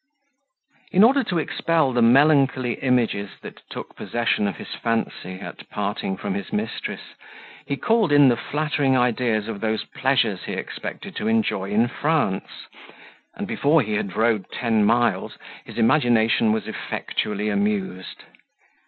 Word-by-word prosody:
In 190 +3 +5
order 265 +4 +5
to 180 - -1
expel 160 -3 +1
the 120 - +2
melancholy 135 0 +4
images 120 -6 0
that - - -10
took - - -8
possession 115 -3 0
of 100 - -3
his - - -8
fancy, 115 -5 -2
at - - -10
parting 105 - -3
from 200 - -3
his 200 0 -5
mistress, 210 +1 -4 0.5
he - - -2
called 225 -7 +2
in 145 -1 +7
the 120 - +4
flattering 145 0 0
ideas 120 -3 +1
of 110 -3 -5
those 110 -1 -1
pleasures 120 -8 0
he - - -4
expected - - -6
to - - -2
enjoy 110 -3 0
in 110 +4 +2
France; 145 -7 -1 0.7
and - - -4
before 145 +1 +2
he 110 -1 -4
had 100 -3 -2
rode 110 -4 +1
ten 115 -3 +1
miles, 120 +3 +1 0.3
his - - -11
imagination 115 -3 +3
was 110 0 -1
effectually 105 0 -3
amused. 100 -3 -2
120 Hz, 145 wpm, -23 LUFS, 105-145 Hz, 0.7 s, in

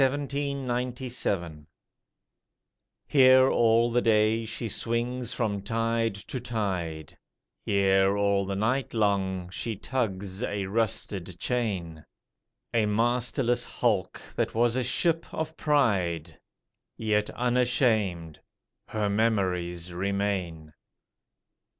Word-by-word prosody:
The 135 - +6
Captain 145 +2 -3 0.5
1797 120 - -3 1.5
_Here 130 -1 +7
all 115 0 +3
the 120 +1 +2
day 110 0 +3
she 115 +1 -3
swings 120 +3 -1
from 110 -5 -1
tide 115 +1 0
to 105 +5 -6
tide, 90 - -3 0.5
Here 95 0 +3
all 100 -1 +1
night 110 +7 -1
long 95 -4 0
she 110 +4 -3
tugs 100 -4 -3
a 100 -5 -2
rusted 100 -4 -2
chain, 95 -10 -2 0.7
A 110 -2 +2
masterless 120 +3 +1
hulk 105 -7 -1 0.2
that - - -1
was 120 +1 +2
a 130 - +1
ship 165 +7 0
of 160 0 -4
pride, 90 - +1 0.6
Yet 105 -1 0
unashamed: 120 - +1 0.5
her 105 -1 -1
memories 90 -5 0
remain. 95 -4 -2
110 Hz, 100 wpm, -27 LUFS, 95-120 Hz, 1.5 s, Here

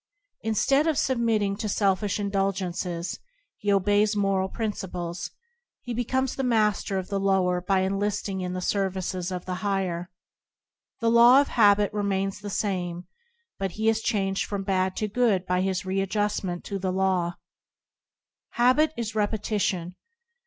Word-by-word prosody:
Instead 270 +7 +2
of 315 -3 +1
submitting 225 -7 +1
to 215 +1 -4
selfish 200 0 +1
indulgences, 190 -3 -2 0.4
he 205 - 0
obeys 205 +2 +3
moral 195 -2 +1
princi 210 -4 -4
ples. 175 0 -4 0.5
He 245 - -4
becomes 260 +2 -1
the 270 - -2
master 215 -5 +1
of 185 -1 -4
the 200 -1 -1
lower 190 -2 +2
by 190 +1 +1
enlisting 195 0 -1
in 180 0 -3
the 185 - -3
service 190 -1 -1
of 180 0 -4
the 185 - -3
higher. 185 -4 -1 0.9
The 230 0 +3
law 240 +3 +8
of 285 - +1
habit 205 -2 +4
remains 195 -1 -1
the 205 0 -6
same, 180 -4 -2 0.5
but 195 -2 -2
he 220 +3 +1
is 225 0 +1
changed 195 -4 0
from 200 -1 -3
bad 190 -1 0
to 215 - -1
good 210 -4 +1
by 180 0 +1
his 190 -1 -1
read 195 0 -1
justment 205 -4 -1
to 200 -1 -4
the 190 -1 -1
law. 185 -2 0 1.2
Habit 255 +6 +3
is 225 -2 -3
repetition. 205 -4 -1
195 Hz, 150 wpm, -26 LUFS, 185-215 Hz, 1.2 s, law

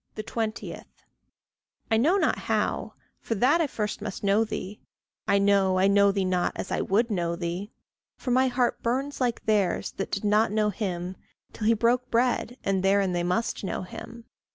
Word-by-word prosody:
20. 220 0 -4 1.1
I 220 - +4
know 315 - +3
not - - +2
how - - -1 0.2
for 225 - -3
that 270 - +3
I 320 - +2
first 210 -6 -3
must 210 -1 -6
know 200 +2 +3
thee. 210 -2 -6 0.5
I 200 - +4
know 195 -2 +3
I 185 - +3
know 200 0 +5
thee 195 -1 0
not 180 -1 0
as - - -5
I - - 0
would 225 +4 +1
know 170 -3 -1
thee, 175 +4 -4 0.5
For 255 - -3
my 260 +2 +4
heart 245 -1 0
burns 265 +4 -2
like 240 -2 -1
theirs 205 -5 +1
that 195 - -3
did 200 - -3
not 210 +1 +3
know 210 0 +1
him, 185 -2 -4 0.4
Till 215 - -2
he 230 - +5
broke 245 +3 +1
bread, 245 0 +1
and 195 -1 +1
therein 195 0 +3
they 175 - 0
must 180 +7 -1
know 190 - -3
him. 230 +5 -10
210 Hz, 180 wpm, -26 LUFS, 195-235 Hz, 1.1 s, know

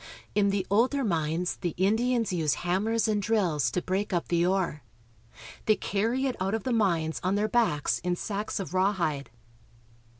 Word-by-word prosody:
In 205 -1 +3
the 195 -1 0
older 255 +7 +3
mines^the 170 -2 -1
Indians 225 +3 +1
use 160 -4 +1
hammers 215 +6 +1
and 210 -1 +1
drills 180 - +1
to 175 - -2
break 195 +3 -1
up 175 -2 -1
the 170 -1 +2
ore. 180 -4 0 0.9
They 215 - +5
carry 230 +8 -1
it 260 - -1
out 195 +3 0
of 225 - -4
the 255 - -1
mines 170 -8 +1
on 185 +2 +1
their 210 +1 +1
backs 215 -12 +1
in 180 0 -1
sacks 205 +3 -3
of 185 -2 -5
rawhide. 185 -7 0
195 Hz, 165 wpm, -28 LUFS, 175-220 Hz, 0.9 s, They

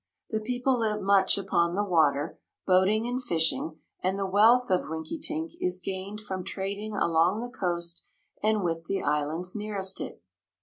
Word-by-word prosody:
The 220 - 0
people 250 +3 0
live 215 -2 0
much 195 -1 +4
upon 175 -3 +1
the 205 - +1
water, 155 -6 +2 0.3
boating 190 +4 +3
and 250 +1 -2
fishing, 160 -6 0 0.2
and 190 +2 0
the 195 - -1
wealth 220 +4 +5
of 180 -3 +1
Rinkitink 310 - -3
is 180 0 0
gained 190 +3 -5
from 190 -3 -5
trading 200 +3 -4
along 170 +2 +2
the 245 0 -6
coast 170 -2 -2 0.4
and 215 -1 +2
with 165 -1 -2
the 195 - -2
islands 155 +6 0
nearest 200 -3 -1
it. - - -7
190 Hz, 160 wpm, -28 LUFS, 170-215 Hz, 0.4 s, wealth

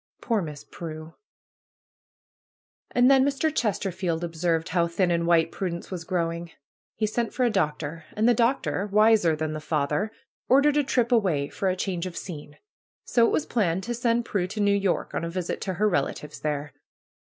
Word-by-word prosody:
Poor 225 -4 0
Miss 150 -4 -7
Prue! 155 -1 -8 1.8
And 245 +2 +4
then 265 -1 +6
Mr. 285 +3 0
Chesterfeld 185 - -1
observed 165 -1 -1
how 170 0 +2
thin 175 +1 +1
and 170 0 +1
white 165 -1 +3
Prudence 175 -2 -4
was 175 -3 -5
growing. 170 -1 -2 0.5
He 215 - 0
sent 225 +1 -2
for 255 - +1
a 240 - +2
doctor. 155 -4 -2
And 220 +2 +2
the 245 - +6
doctor, 230 -4 +1
wiser 210 -5 +4
than 155 0 -3
the 155 - -4
father, 150 +6 -1 0.4
ordered 280 +3 +5
a 295 - +4
trip 250 -3 +1
away 180 -12 +2
for 195 - -1
a 185 - 0
change 185 -1 -2
of 175 - -8
scene. 150 -5 -8 0.5
So 235 -1 +4
it - - 0
was 310 - +1
planned 190 -5 0
to 240 - -3
send 235 0 +1
Prue 185 -5 -1
to 210 - -6
New 200 -1 +3
York 195 -3 0
on - - -2
a 170 - -2
visit 180 0 -3
to 190 -2 -3
her 210 +4 +2
relatives 150 -4 -2
there. 150 -1 -3
185 Hz, 185 wpm, -26 LUFS, 165-225 Hz, 1.8 s, then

